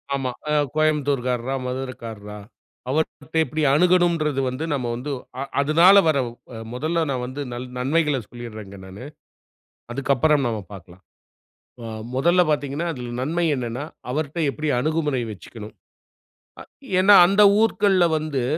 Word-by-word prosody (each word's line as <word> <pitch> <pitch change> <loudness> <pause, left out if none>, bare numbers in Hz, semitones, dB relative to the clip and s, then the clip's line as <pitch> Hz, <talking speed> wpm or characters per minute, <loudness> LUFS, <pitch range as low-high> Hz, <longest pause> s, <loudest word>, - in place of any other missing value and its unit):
ஆமா. 130 -2 -2 0.2
அ, - - 0 0.2
கோயம்புத்தூர்காரரா, 135 -5 0
மதுரைக்காரரா. 115 -5 -6 0.5
அவர்கிட்ட 160 +2 -2
எப்டி 155 0 -3
அணுகனும்ன்றது 170 -4 +2
வந்து, 130 +5 -5
நம்ம 125 -4 -2
வந்து 135 +4 -5 0.3
அ - - -2 0.2
அதுனால 165 +7 +6
வர்ற 145 -3 +3 0.5
மொதல்ல 160 +5 -1
நான் 125 -2 -2
வந்து 130 +3 -6
நன் 125 +1 -6
நன்மைகள 150 +1 +1
சொல்லிட்றேன்ங்க 110 -5 -9
நானு. 95 +7 -10 0.9
அதுக்கப்புறம் 140 +2 +2
நம்ம 110 -2 -2
பாக்கலாம். 90 -1 -13 0.8
அ - - -7 0.3
மொதல்ல 170 +6 +3
பார்த்தீங்கனா, 145 +3 -2
அதில 120 -2 -7
நன்மை! 165 +5 0
என்னன்னா? 125 +3 -4 0.3
அவர்ட்ட 155 +3 -3
எப்டி 155 +1 -3
அணுகுமுறை 150 -3 0
வச்சிக்கணும்? 105 +3 -11 0.9
அ - - -9 0.4
ஏன்னா? 200 +2 +7
அந்த 200 +2 +3 0.2
ஊர்க்கள்ல 200 -5 +3
வந்து, 150 -5 -2
140 Hz, 125 wpm, -22 LUFS, 125-155 Hz, 0.9 s, ஏன்னா